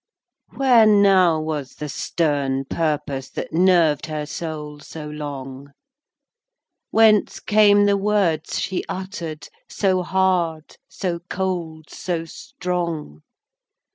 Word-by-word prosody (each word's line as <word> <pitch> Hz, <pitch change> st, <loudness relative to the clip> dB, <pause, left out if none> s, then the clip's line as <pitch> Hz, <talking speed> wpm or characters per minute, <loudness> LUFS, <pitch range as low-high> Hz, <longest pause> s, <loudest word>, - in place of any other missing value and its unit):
Where 245 Hz, -5 st, +5 dB
now 195 Hz, -5 st, +5 dB
was 155 Hz, -3 st, -4 dB
the 150 Hz, -, -6 dB
stern 140 Hz, -3 st, -1 dB
purpose 145 Hz, -4 st, -2 dB
That -, -, -6 dB
nerved 170 Hz, -4 st, +3 dB
her 155 Hz, -1 st, -4 dB
soul 150 Hz, -2 st, -6 dB
so 150 Hz, +1 st, -9 dB
long? 140 Hz, -2 st, -7 dB, 1.2 s
Whence 220 Hz, -2 st, +4 dB
came 205 Hz, -1 st, +4 dB
the 200 Hz, 0 st, +3 dB
words 195 Hz, -5 st, 0 dB
she 190 Hz, -, -2 dB
utter'd, 175 Hz, -5 st, -6 dB, 0.2 s
So 190 Hz, -2 st, +1 dB
hard, 180 Hz, -4 st, 0 dB
so 175 Hz, -3 st, -3 dB
cold, 170 Hz, -5 st, -4 dB
so 170 Hz, -3 st, -3 dB
strong? 170 Hz, -, -5 dB
165 Hz, 105 wpm, -22 LUFS, 150-190 Hz, 1.2 s, Where